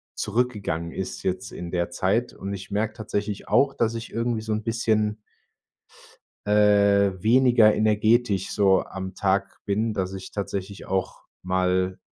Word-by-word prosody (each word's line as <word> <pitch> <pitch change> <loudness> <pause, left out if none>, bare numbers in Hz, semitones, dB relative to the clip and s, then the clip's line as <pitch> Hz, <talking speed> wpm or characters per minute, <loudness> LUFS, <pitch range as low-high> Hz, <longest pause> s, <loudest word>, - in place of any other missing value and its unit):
zurückgegangen 105 -8 -2
ist 95 - -5
jetzt 95 +1 -2
in 85 0 -7
der 85 -1 -1
Zeit 110 +6 0
und 100 +1 -6
ich 95 +1 -8
merke 105 +2 -1
tatsächlich 105 -1 -4
auch, 135 0 +3
dass 115 -1 0
ich 115 0 -7
irgendwie 115 -1 -1
so 110 0 -3
'n 105 0 -2
bisschen 110 -2 0 1.3
äh, 100 -2 +3
weniger 120 -2 +5
energetisch 110 -1 +2
so 95 -2 +3
am 95 -1 -7
Tag 100 0 -1
bin, 105 +2 0
dass 95 -1 -2
ich 95 -1 -7
tatsächlich 100 -1 -5
auch 95 -1 -3 0.2
mal 95 0 0
100 Hz, 145 wpm, -25 LUFS, 95-110 Hz, 1.3 s, weniger